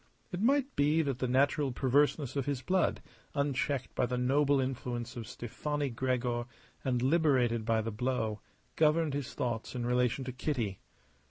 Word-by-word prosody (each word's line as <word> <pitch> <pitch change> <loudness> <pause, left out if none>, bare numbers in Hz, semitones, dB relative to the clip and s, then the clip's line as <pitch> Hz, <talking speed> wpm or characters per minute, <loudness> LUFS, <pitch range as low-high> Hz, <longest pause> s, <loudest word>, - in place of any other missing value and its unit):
It 180 0 -3
might 275 +3 +2
be 150 +3 +3
that 135 -4 -2
the 130 - 0
natural 140 +2 +2
perverseness 135 +2 +2
of 140 -2 -1
his 135 -3 -2
blood, 185 +6 +1 0.3
unchecked 140 -2 -1
by 125 - +1
the 125 - -2
noble 140 +3 +3
influence 125 -2 -3
of 115 -2 -6
Stefani 145 +4 -3
Gregor 120 -1 -1 0.4
and 125 -2 0
liberated 130 -7 +3
by 115 -1 +2
the 115 +1 -3
blow, 110 -2 -1 0.4
governed 155 -1 +3
his 140 -1 -4
thoughts 120 -1 -3
in 120 -1 -2
relation 125 +1 +1
to 130 - -3
Kitty. 120 -7 -2
130 Hz, 160 wpm, -31 LUFS, 120-145 Hz, 0.4 s, be